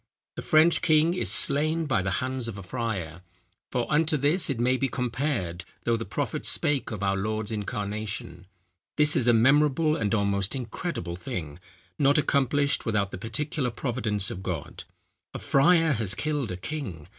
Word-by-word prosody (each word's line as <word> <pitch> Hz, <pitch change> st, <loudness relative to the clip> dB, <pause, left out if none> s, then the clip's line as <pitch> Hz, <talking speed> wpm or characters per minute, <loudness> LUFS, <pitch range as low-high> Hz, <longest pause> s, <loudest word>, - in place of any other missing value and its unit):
The -, -, -5 dB
French 155 Hz, +2 st, +4 dB
king 160 Hz, +1 st, +3 dB
is 180 Hz, -, -1 dB
slain 155 Hz, +3 st, +2 dB
by 135 Hz, -9 st, +1 dB
the 95 Hz, -, -2 dB
hands 130 Hz, -2 st, -3 dB
of 110 Hz, -3 st, -6 dB
a 100 Hz, -, -8 dB
friar. 90 Hz, -6 st, -4 dB, 0.5 s
For 125 Hz, -1 st, -1 dB
unto 155 Hz, 0 st, +2 dB
this 150 Hz, +7 st, +2 dB
it 135 Hz, -4 st, -2 dB
may 125 Hz, +2 st, +2 dB
be 135 Hz, +1 st, 0 dB
compared, 120 Hz, -, -2 dB, 0.2 s
though 115 Hz, -, +2 dB
the 115 Hz, 0 st, -4 dB
prophet -, -, -3 dB
spake 140 Hz, -5 st, 0 dB
of 105 Hz, -3 st, -5 dB
our 100 Hz, 0 st, +1 dB
Lord's 110 Hz, +2 st, -2 dB
incarnation. 105 Hz, -4 st, -4 dB, 0.5 s
This 150 Hz, 0 st, +5 dB
is 125 Hz, -, +1 dB
a -, -, +7 dB
memorable 145 Hz, +6 st, +4 dB
and 110 Hz, -3 st, 0 dB
almost 100 Hz, 0 st, 0 dB
incredible 120 Hz, -, -4 dB
thing, 80 Hz, -4 st, -6 dB, 0.4 s
not 140 Hz, 0 st, +4 dB
accomplished 145 Hz, -1 st, +2 dB
without 100 Hz, -3 st, 0 dB
the -, -, -7 dB
particular 135 Hz, -, -2 dB
providence 115 Hz, -5 st, -2 dB
of 90 Hz, -, -6 dB
God. 90 Hz, -6 st, -5 dB, 0.5 s
A -, -, -1 dB
friar 165 Hz, +3 st, +3 dB
has 105 Hz, -7 st, -1 dB
killed 145 Hz, -3 st, -2 dB
a 90 Hz, -, -4 dB
king. 95 Hz, -, -6 dB
120 Hz, 170 wpm, -26 LUFS, 100-145 Hz, 0.5 s, a